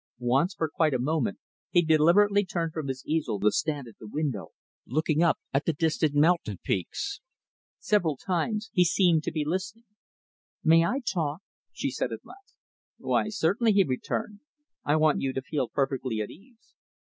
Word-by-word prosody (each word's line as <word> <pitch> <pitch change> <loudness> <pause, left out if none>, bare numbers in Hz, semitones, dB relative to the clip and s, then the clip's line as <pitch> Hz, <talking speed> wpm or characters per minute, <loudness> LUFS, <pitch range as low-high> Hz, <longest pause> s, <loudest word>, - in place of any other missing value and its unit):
Once, 135 +10 +1
for 160 - -1
quite 155 -2 +1
a - - 0
moment, 160 - 0 0.3
he 175 -2 +4
deliberately 175 +6 +4
turned 170 -4 -3
from 155 -3 -4
his 130 -1 -5
easel 155 -10 -1
to 105 +1 +3
stand 145 -5 -2
at 115 - -15
the 110 - -10
window, 140 -4 -3 0.4
looking 155 +4 +1
up 170 -1 +3 0.2
at 135 +2 +1
the 165 - +1
distant 155 -1 0
mountain 150 - +2
peaks. 100 - -3 0.6
Several 170 -9 +1
times, 210 - -2
he 180 - +5
seemed 175 -2 +3
to - - -3
be 155 -2 -2
listening. 190 +8 -3 0.8
"May 165 +1 +6
I 255 +11 0
talk?" 170 - -2 0.3
she - - -3
said - - -2
at - - -7
last. 395 +1 -16 0.4
"Why, - - 0
certainly," 210 +3 +2
he 200 -1 +5
returned. 180 +8 -3 0.4
"I 145 - +2
want 155 -1 +3
you 135 -1 -1
to 135 - -2
feel 140 -3 -2
perfectly 135 -4 -1
at 105 - -3
ease. 225 +5 -19
160 Hz, 175 wpm, -27 LUFS, 140-190 Hz, 0.8 s, May